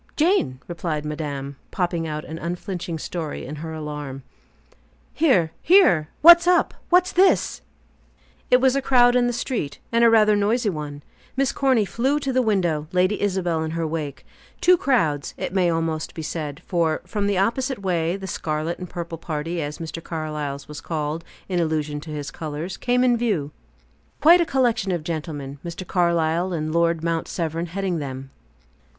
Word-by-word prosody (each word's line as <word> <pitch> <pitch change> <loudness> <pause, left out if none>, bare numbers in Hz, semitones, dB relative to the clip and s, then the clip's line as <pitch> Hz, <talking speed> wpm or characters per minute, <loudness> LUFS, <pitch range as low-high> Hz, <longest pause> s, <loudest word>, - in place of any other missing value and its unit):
"Jane," 310 - +2
replied 165 -3 -3
madame, 145 -3 -4
popping 170 -2 -1
out 150 0 -4
an 160 +1 -7
unflinching 175 -1 -4
story 160 -1 -5
in 150 +4 -7
her 160 +2 -6
alarm. 150 -4 -6 0.9
"Here! 250 - +3
Here! 190 - +5
What's 340 +1 +9
up? 360 -1 +3 0.2
What's 360 +1 +4
this?" 375 +2 +3 0.9
It 250 - +6
was 260 0 +3
a 275 - +1
crowd 245 -2 +5
in 245 -1 +3
the - - +1
street, 240 - -3
and 230 0 +3
rather 215 -1 +5
a - - +3
noisy 210 +2 +1
one. 145 -3 -6 0.3
Miss 275 0 +2
Corny 260 -6 +2
flew 265 +8 0
to 275 -2 -2
the 255 - +3
window, 175 -9 0
Lady 185 +3 +1
Isabel 185 -5 0
in 160 - -2
her 165 - -1
wake. 155 -3 -4 0.3
Two 365 - +6
crowds, 185 - 0
it - - -4
may 185 -3 +3
almost 165 -1 -2
be 160 - -5
said; 150 -2 -5
for, 165 -3 0
from 205 -2 -2
the 200 -2 +1
opposite 235 +3 0
way, 170 -2 0
the 195 - -7
scarlet 155 -2 -3
and 180 -2 -7
purple 170 -2 -6
party 165 +1 -3
as 145 0 -4
Mr. 165 0 -6
Carlyle's 150 -3 -4
was 150 -1 -8
called, 155 0 -3 0.2
in 180 -2 -1
allusion 155 -3 -1
to 160 - -10
his 150 -1 -5
colors 160 +2 -5
came 250 0 +1
in 245 -1 +4
view. 195 -12 -1 0.7
Quite 340 +3 +7
a 335 - 0
collection 240 -6 +1
of 175 -3 -2
gentlemen 150 -4 -5
Mr. 170 +2 -6
Carlyle 170 0 +1
and 155 -1 -2
Lord 170 -1 +2
Mount 165 -1 -1
Severn 165 0 -3
heading 185 -1 -2
them. 135 -1 -6
170 Hz, 170 wpm, -23 LUFS, 155-220 Hz, 0.9 s, What's